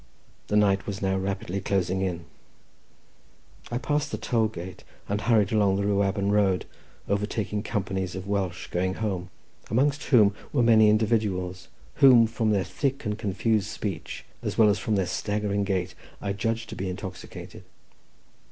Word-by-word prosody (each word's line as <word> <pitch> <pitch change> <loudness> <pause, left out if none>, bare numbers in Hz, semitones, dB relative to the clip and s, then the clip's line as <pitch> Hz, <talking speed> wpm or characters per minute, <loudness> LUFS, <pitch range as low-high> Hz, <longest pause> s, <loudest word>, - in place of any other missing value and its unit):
The 105 - -1
night 100 -2 +3
was 100 -2 -3
now 95 0 +1
rapidly 95 0 -2
closing 95 -1 0
in. 85 -3 -2 1.4
I 120 - -2
passed 150 +3 -1
the 110 - -2
toll 110 +1 +1
gate, 90 -3 -8 0.2
and 100 +1 -1
hurried 110 -4 +3
along 100 -3 +3
the 100 - 0
Rhiwabon 100 0 +1
road, 100 -3 +2 0.4
overtaking 105 +1 -1
companies 95 -4 -3
of 95 0 -6
Welsh 95 -3 -2
going 95 +1 0
home, 95 -5 -3 0.4
amongst 140 +5 +1
whom 105 -7 +5 0.2
were 130 -5 +2
many 110 -2 +6
individuals, 105 -4 0 0.3
whom, 125 -4 +8
from 115 0 -1
their 100 -3 +2
thick 140 +2 -2
and 105 -1 -1
confused 105 0 0
speech, 100 -6 -5 0.2
as - - -4
well 110 -2 +6
as 100 0 +1
from 110 - 0
their 95 -2 +1
staggering 105 +2 -1
gait, 95 -2 -1 0.3
I 100 -1 -2
judged 115 +3 -2
to - - -6
be 95 0 -3
intoxicated. 95 +1 -8
100 Hz, 155 wpm, -26 LUFS, 95-110 Hz, 1.4 s, whom